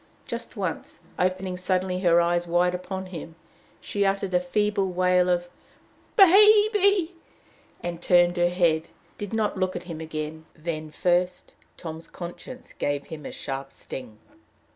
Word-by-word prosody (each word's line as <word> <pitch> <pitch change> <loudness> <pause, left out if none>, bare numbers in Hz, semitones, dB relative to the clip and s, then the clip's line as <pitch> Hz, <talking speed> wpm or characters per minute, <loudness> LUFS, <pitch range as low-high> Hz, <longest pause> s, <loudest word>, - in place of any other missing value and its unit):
Just - - -6
once, - - -4 0.2
opening 185 0 0
suddenly 185 0 0
her 175 -2 +4
eyes 175 0 +1
wide 175 +1 +2
upon 190 +1 -4
him, 165 -3 -8 0.4
she 205 - -1
uttered 195 -1 0
a 180 - +5
feeble 200 +2 0
wail 180 0 +3
of 175 0 +1 0.7
"Baby!" 405 -2 +6 0.7
and, 175 -1 -4
turning 175 0 +4
her 175 0 +2
head, 170 -3 +2 0.3
did 205 -2 -5
not 220 -2 0
look 185 0 0
at - - -4
him 165 -3 -7
again. 160 0 -6
Then, 155 -1 -4
first, 180 +3 0 0.2
Tom's 160 -1 -7
conscience 185 +8 -9
gave 145 -1 -2
him 150 -3 -8
a - - -7
sharp 135 -1 -5
sting. 120 -5 -9
180 Hz, 140 wpm, -26 LUFS, 165-190 Hz, 0.7 s, Baby